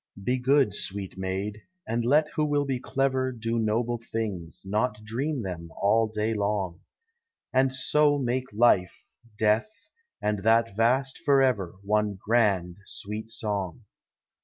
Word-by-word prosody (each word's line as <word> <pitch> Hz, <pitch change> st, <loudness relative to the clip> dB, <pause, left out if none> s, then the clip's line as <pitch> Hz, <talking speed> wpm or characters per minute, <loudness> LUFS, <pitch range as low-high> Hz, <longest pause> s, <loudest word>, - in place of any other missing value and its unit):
lie 125 Hz, -, +3 dB
good, 130 Hz, -3 st, +3 dB
sweet 100 Hz, -1 st, -3 dB
maid, 95 Hz, +3 st, -3 dB, 0.3 s
and 115 Hz, +1 st, -1 dB
let 145 Hz, +6 st, +4 dB
who 155 Hz, -, 0 dB
will 145 Hz, -1 st, +1 dB
be 135 Hz, -2 st, -1 dB
clever; 130 Hz, 0 st, 0 dB
Do 115 Hz, -1 st, -2 dB
noble 115 Hz, +2 st, 0 dB
things, 100 Hz, -7 st, -3 dB
not 105 Hz, +2 st, -1 dB
dream 130 Hz, +5 st, -2 dB
them, 85 Hz, -3 st, -6 dB
all 110 Hz, +3 st, +3 dB
day 110 Hz, +1 st, -1 dB
long: 100 Hz, -4 st, -2 dB, 0.7 s
And 130 Hz, 0 st, +3 dB
so 145 Hz, +3 st, +3 dB
make 130 Hz, 0 st, -2 dB
life, 105 Hz, -4 st, +3 dB, 0.4 s
death, 110 Hz, -, +2 dB, 0.5 s
and 105 Hz, -1 st, -1 dB
that 115 Hz, +1 st, +2 dB
vast 130 Hz, +4 st, +2 dB
forever 130 Hz, -, +2 dB
One 105 Hz, -1 st, 0 dB
grand, 100 Hz, -6 st, +1 dB
sweet 105 Hz, +2 st, -6 dB
song. 105 Hz, -2 st, -3 dB
110 Hz, 135 wpm, -27 LUFS, 100-130 Hz, 0.7 s, let